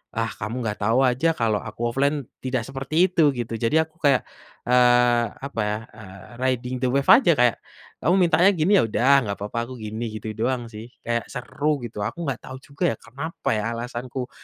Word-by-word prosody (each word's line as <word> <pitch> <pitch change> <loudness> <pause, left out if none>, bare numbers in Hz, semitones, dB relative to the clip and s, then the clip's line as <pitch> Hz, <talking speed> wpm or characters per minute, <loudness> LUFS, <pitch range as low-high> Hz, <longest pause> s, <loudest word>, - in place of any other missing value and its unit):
ah, 115 0 0
kamu 110 +3 -4
nggak 105 - -3
tahu 115 +4 +3
aja 125 +6 +1
kalau 110 -3 +1
aku - - -10 0.2
offline 140 +2 +2 0.3
tidak 130 -2 -1
seperti 135 +2 -6
itu 180 -2 0 0.2
gitu 115 -1 -4
jadi 115 +6 +1
aku 160 - -36
kayak, 140 -4 +4 0.5
eee, 120 -1 +4 0.2
apa 140 - -7
ya, 105 0 -1 0.2
eee, 100 -3 -12 0.2
riding 130 -1 -1
the - - +3
wave 140 +1 0
aja 240 -9 +7
kayak, 120 -2 +4 0.5
kamu 175 - +3
mintanya 175 +2 +5
gini 170 +1 +1
ya - - +4
udah 120 +4 +2
gak 100 -1 -2
apa-apa 105 +3 -5
aku 130 - -9
gini 110 +2 -5
gitu 110 0 -7
doang 120 +1 -1
sih 110 0 -9 0.2
kayak 115 0 -2
seru 140 +3 -2
gitu 120 -3 -8
aku 170 - -5
nggak 135 -4 -1
tahu 130 - -8
juga 140 +5 -7
ya - - -8
kenapa 140 +8 -5
ya 110 +2 -2
alasanku 125 +2 -5
125 Hz, 195 wpm, -23 LUFS, 115-140 Hz, 0.5 s, aja